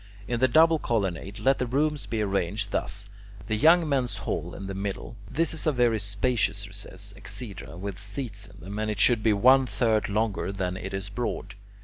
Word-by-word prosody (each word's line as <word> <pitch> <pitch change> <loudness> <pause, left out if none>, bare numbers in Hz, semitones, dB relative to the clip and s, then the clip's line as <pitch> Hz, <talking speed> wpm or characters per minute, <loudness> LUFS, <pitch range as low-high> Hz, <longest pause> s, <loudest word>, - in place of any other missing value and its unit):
In 120 -1 -1
the 130 - +5
double 160 +5 +5
colonnade 100 - -2
let 130 +6 +2
the 125 - 0
rooms 145 +3 0
be 110 -2 -1
arranged 100 +1 -1
thus: 100 -1 -2 0.4
the 110 - -1
young 165 +8 +5
men's 125 -8 0
hall 85 +1 -2
(B) - - -9
in 100 - -7
the 95 - -4
middle; 100 +3 -4
this 165 +6 +1
is 160 0 0
a - - +5
very 120 -4 +2
spacious 100 0 0
recess 100 0 -6
(exedra) 100 -6 -6
with 95 0 -5
seats 105 0 -6
in 100 -1 -15
it, 100 +2 -5
and 110 - -1
it 105 -1 -3
should 115 +1 +5
be 110 - +3
one 130 +5 +5
third 110 -4 +1
longer 105 -1 0
than 95 -2 -2
it 95 +1 -5
is 95 +1 -4
broad. 100 -2 -3
105 Hz, 205 wpm, -27 LUFS, 100-125 Hz, 0.4 s, the